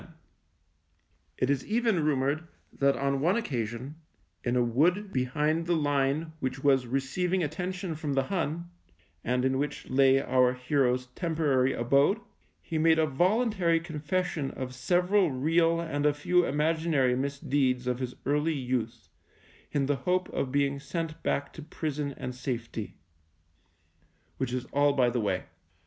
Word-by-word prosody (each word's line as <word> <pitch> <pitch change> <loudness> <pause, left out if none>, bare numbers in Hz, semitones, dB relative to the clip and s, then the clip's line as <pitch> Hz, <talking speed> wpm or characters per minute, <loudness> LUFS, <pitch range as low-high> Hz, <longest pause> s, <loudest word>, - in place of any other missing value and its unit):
go - - -14
THE - - -20
MINE 160 -1 -22 1.2
It 130 - 0
is 140 - 0
even 220 -6 +1
rumoured 150 +2 0 0.3
that 140 0 +2
on 140 0 0
one 175 +6 +3
occasion, 125 - -3 0.5
in 120 0 0
a 125 - +3
wood 175 - +1
behind 150 +6 0
the 175 - +2
line 145 +1 0
which 130 -1 -3
was 135 -3 +3
receiv 135 +8 -1
ing 185 -2 +2
attention 180 +3 -3
from 150 -2 -3
the 135 0 +2
Hun, 170 +1 -3 0.5
and 125 +2 0
in 130 0 +1
which 145 0 -3
lay 135 0 +5
our 130 -2 +2
hero's 125 -1 +1
temporary 150 -6 +1
abode, 140 - +3 0.4
he 160 - -2
made 160 0 +4
a 160 - +4
voluntary 180 - +2
confession 165 -1 -2
of 130 -1 -6
several 180 +7 +2
real 165 +5 +2
and 150 -3 0
a 145 - +2
few 180 +4 +2
imaginary 150 -3 +1
misdeeds 135 -1 0
of 125 0 -1
his 125 -1 -4
early 150 +4 +1
youth 120 -4 -3 0.6
in 140 -2 +1
the 140 0 0
hope 180 +7 0
of 130 - -2
being 140 0 +1
sent 165 +1 -4
back 140 - -1
to 160 - -9
prison 150 -2 -4
and 125 - -5
safety. 120 -4 -5 1.4
Which 130 -2 -2
is 125 -1 -2
all 145 0 +4
by 125 -3 +3
the 120 - -1
way. 95 -3 -1
145 Hz, 155 wpm, -28 LUFS, 130-165 Hz, 1.4 s, lay